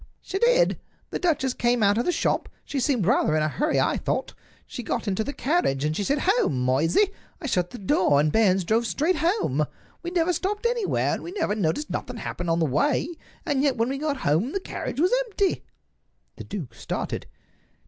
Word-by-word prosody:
"She 385 Hz, -, -3 dB
did. -, -, +3 dB, 0.3 s
The -, -, -2 dB
duchess 290 Hz, -7 st, +1 dB
came 240 Hz, -2 st, +1 dB
out 200 Hz, 0 st, +4 dB
of 240 Hz, -, 0 dB
the -, -, +2 dB
shop. -, -, 0 dB, 0.2 s
She 280 Hz, -, -3 dB
seemed 250 Hz, -, +1 dB
rather 190 Hz, -7 st, +3 dB
in 155 Hz, -, +2 dB
a -, -, +2 dB
hurry, 295 Hz, -, 0 dB
I -, -, +2 dB
thought. -, -, -2 dB, 0.3 s
She -, -, -6 dB
got 230 Hz, -, -3 dB
into 200 Hz, +2 st, 0 dB
the 285 Hz, -, -4 dB
carriage, 255 Hz, -, 0 dB
and 155 Hz, +1 st, 0 dB
she 205 Hz, -, -1 dB
said, 285 Hz, +8 st, 0 dB
'Home, 255 Hz, -, +2 dB
Moysey!' 165 Hz, -, +2 dB, 0.3 s
I 325 Hz, -, -8 dB
shut 180 Hz, -9 st, 0 dB
the 245 Hz, -, -8 dB
door, 185 Hz, -7 st, +3 dB
and 150 Hz, +1 st, +2 dB
Barnes 195 Hz, -3 st, +3 dB
drove 225 Hz, +6 st, +1 dB
straight 310 Hz, -, +1 dB
home. 305 Hz, -, +1 dB, 0.4 s
We 345 Hz, -, -4 dB
never 355 Hz, 0 st, +1 dB
stopped 410 Hz, +6 st, -2 dB
anywhere, 470 Hz, -3 st, +1 dB
and -, -, -3 dB
we 345 Hz, -, -7 dB
never 335 Hz, -, 0 dB
noticed 210 Hz, -, -1 dB
nothing 250 Hz, -, -4 dB
happen 175 Hz, -5 st, -4 dB
on 165 Hz, -, +2 dB
the 165 Hz, -, +2 dB
way; 280 Hz, -, +1 dB, 0.4 s
and 285 Hz, -4 st, +1 dB
yet 280 Hz, -3 st, +2 dB
when 230 Hz, +2 st, +1 dB
we 275 Hz, +1 st, -2 dB
got 295 Hz, -2 st, -1 dB
home 165 Hz, -, +2 dB
the 390 Hz, -, 0 dB
carriage 285 Hz, -, -5 dB
was 360 Hz, +8 st, +3 dB
empty." 400 Hz, -3 st, 0 dB, 0.8 s
The -, -, -8 dB
duke 175 Hz, -, -6 dB
started. -, -, -4 dB
250 Hz, 210 wpm, -25 LUFS, -, 0.8 s, out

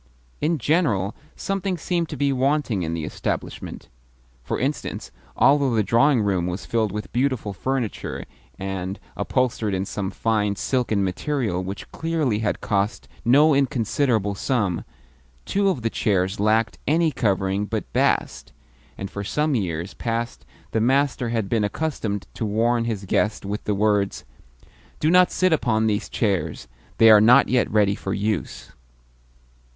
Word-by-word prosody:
In 160 Hz, +2 st, +1 dB
general, 125 Hz, -, +1 dB, 0.2 s
something 195 Hz, -1 st, -2 dB
seemed 170 Hz, 0 st, -1 dB
to -, -, -5 dB
be 140 Hz, -1 st, +1 dB
wanting 135 Hz, -5 st, +1 dB
in 80 Hz, -1 st, -2 dB
the 80 Hz, -, -4 dB
establishment. -, -, -5 dB, 0.6 s
For -, -, -3 dB
instance, -, -, -3 dB, 0.3 s
although 140 Hz, -3 st, +4 dB
the 110 Hz, -, +3 dB
drawing 120 Hz, +3 st, +3 dB
room 95 Hz, -4 st, 0 dB
was 90 Hz, +2 st, -4 dB
filled 110 Hz, -3 st, 0 dB
with 105 Hz, +2 st, -6 dB
beautiful 125 Hz, -5 st, 0 dB
furniture, 130 Hz, +1 st, -3 dB, 0.3 s
and 95 Hz, 0 st, -4 dB, 0.2 s
upholstered 115 Hz, -6 st, 0 dB
in 95 Hz, +1 st, -1 dB
some 100 Hz, -1 st, -3 dB
fine 105 Hz, -1 st, 0 dB
silken 115 Hz, -4 st, 0 dB
material 95 Hz, -1 st, -1 dB
which 95 Hz, +2 st, -7 dB
clearly 160 Hz, -9 st, -1 dB
had 110 Hz, -, -1 dB
cost 100 Hz, +1 st, -1 dB, 0.2 s
no 145 Hz, +6 st, +5 dB
inconsiderable 125 Hz, -5 st, +1 dB
sum, 100 Hz, -6 st, -1 dB, 0.6 s
two 200 Hz, 0 st, +1 dB
of 135 Hz, -11 st, -2 dB
the 115 Hz, -, +1 dB
chairs 95 Hz, -3 st, 0 dB
lacked 110 Hz, +1 st, +1 dB
any 160 Hz, +1 st, +3 dB
covering 100 Hz, -4 st, 0 dB
but -, -, -4 dB
bast, -, -, 0 dB, 0.5 s
and 95 Hz, -, -6 dB
for 100 Hz, -, -5 dB
some 150 Hz, +8 st, 0 dB
years 90 Hz, -5 st, -2 dB
past 115 Hz, -, -4 dB, 0.2 s
the 110 Hz, -, +1 dB
master 130 Hz, 0 st, +1 dB
had 115 Hz, -3 st, -1 dB
been 110 Hz, 0 st, +1 dB
accustomed 105 Hz, -4 st, -2 dB
to -, -, -5 dB
warn 115 Hz, +3 st, +1 dB
his 105 Hz, -4 st, -3 dB
guests 105 Hz, +2 st, 0 dB
with 105 Hz, +2 st, -4 dB
the 105 Hz, -, 0 dB
words, 105 Hz, -1 st, +1 dB, 0.7 s
"Do 155 Hz, -, +2 dB
not 180 Hz, 0 st, +6 dB
sit 185 Hz, -2 st, +2 dB
upon 110 Hz, -7 st, +1 dB
these 105 Hz, -1 st, 0 dB
chairs; 90 Hz, -, -1 dB, 0.3 s
they 115 Hz, -1 st, +8 dB
are 105 Hz, -1 st, +8 dB
not 125 Hz, +5 st, +6 dB
yet 125 Hz, 0 st, +2 dB
ready 105 Hz, -2 st, +3 dB
for 95 Hz, -1 st, -4 dB
use." 105 Hz, -1 st, -3 dB
110 Hz, 150 wpm, -23 LUFS, 100-135 Hz, 0.7 s, they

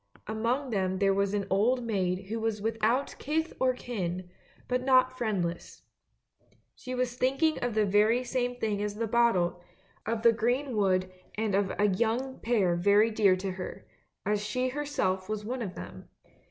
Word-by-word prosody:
Among 235 Hz, +5 st, -1 dB
them 190 Hz, -3 st, 0 dB
there 195 Hz, 0 st, +3 dB
was 200 Hz, +1 st, 0 dB
an 200 Hz, -1 st, -1 dB
old 240 Hz, +6 st, +2 dB
maid 190 Hz, -3 st, -1 dB
who 225 Hz, +1 st, -2 dB
was 220 Hz, -1 st, -1 dB
without 225 Hz, +5 st, 0 dB
kith 320 Hz, +3 st, -1 dB
or 260 Hz, -1 st, +3 dB
kin, 185 Hz, -7 st, -4 dB, 0.4 s
but 250 Hz, 0 st, 0 dB
not 255 Hz, -1 st, +4 dB
friendless. 190 Hz, -8 st, -3 dB, 0.9 s
She 255 Hz, 0 st, -6 dB
was 250 Hz, -1 st, -1 dB
thinking 275 Hz, +5 st, +1 dB
of 245 Hz, -3 st, -2 dB
the 215 Hz, -1 st, +3 dB
very 210 Hz, +5 st, +3 dB
same 245 Hz, -1 st, -1 dB
thing 215 Hz, -4 st, -2 dB
as 205 Hz, 0 st, -2 dB
the 230 Hz, +2 st, -1 dB
bottle; 210 Hz, -7 st, +2 dB, 0.5 s
of 225 Hz, 0 st, -1 dB
the 235 Hz, -1 st, +6 dB
green 245 Hz, +4 st, 0 dB
wood 185 Hz, -3 st, +1 dB, 0.2 s
and 215 Hz, -2 st, -1 dB
of 195 Hz, -1 st, +1 dB
a 210 Hz, -, +3 dB
young 235 Hz, +6 st, -1 dB
pair 205 Hz, -7 st, +2 dB
very 205 Hz, +5 st, +4 dB
dear 205 Hz, -4 st, +4 dB
to 190 Hz, +1 st, -3 dB
her, 185 Hz, 0 st, -7 dB, 0.4 s
as 210 Hz, 0 st, 0 dB
she 250 Hz, +5 st, -1 dB
herself 250 Hz, -9 st, -2 dB
was 215 Hz, -1 st, -3 dB
one 250 Hz, +3 st, -3 dB
of 195 Hz, -5 st, -5 dB
them. 95 Hz, +1 st, -9 dB
220 Hz, 170 wpm, -29 LUFS, 195-245 Hz, 0.9 s, the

